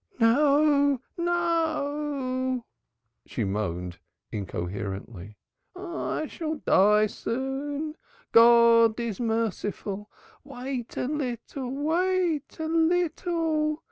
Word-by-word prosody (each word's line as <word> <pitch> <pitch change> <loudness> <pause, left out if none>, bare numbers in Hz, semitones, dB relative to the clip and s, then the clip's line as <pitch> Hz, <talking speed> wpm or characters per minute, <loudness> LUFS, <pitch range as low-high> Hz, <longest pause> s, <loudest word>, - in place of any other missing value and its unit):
"No, 285 +3 +4 0.2
no," 295 -7 -1 0.6
she 115 - -3
moaned 90 -3 -3 0.3
incoherently. 100 +1 -5 0.4
"I 350 -4 -3
shall 315 +1 -4
die 210 -6 +4
soon. 270 +7 -3 0.4
God 230 -1 +6
is 230 -5 -3
merciful. 210 -3 -2 0.3
Wait 260 -3 -6
a - - 0
little, 260 -2 -4
wait 325 +2 0
a 320 - -2
little. 325 -2 +1
270 Hz, 80 wpm, -27 LUFS, 225-310 Hz, 0.6 s, God